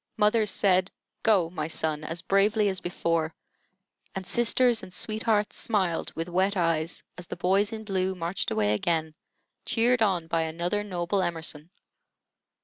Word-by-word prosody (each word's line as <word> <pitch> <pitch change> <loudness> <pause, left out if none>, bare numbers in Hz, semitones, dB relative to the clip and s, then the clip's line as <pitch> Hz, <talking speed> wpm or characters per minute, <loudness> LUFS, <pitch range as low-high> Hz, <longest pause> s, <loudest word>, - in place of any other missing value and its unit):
Mothers 210 0 +3
said, 185 -1 +3 0.3
"Go 195 -8 +3
my 155 -4 -3
son," 155 -1 0
as 165 +2 -5
bravely 205 +2 +3
as 190 -1 -3
before, 165 -2 -1 0.8
and 190 -1 -4
sisters 240 +3 +3
and 185 - -10
sweethearts 215 +1 0
smiled 190 -7 0
with 165 +1 -3
wet 190 +3 +1
eyes 165 -1 0 0.2
as 175 - -7
the - - -5
boys 195 +4 +2
in 220 -1 -6
blue 190 -2 -1
marched 175 +1 -2
away 105 -1 +1
again, 160 +7 -1 0.5
cheered 240 +1 +2
on 185 -6 +2
by 165 0 0
another 170 +5 -1
noble 185 0 -1
Emerson. 165 -3 -3
185 Hz, 145 wpm, -27 LUFS, 165-205 Hz, 0.8 s, Mothers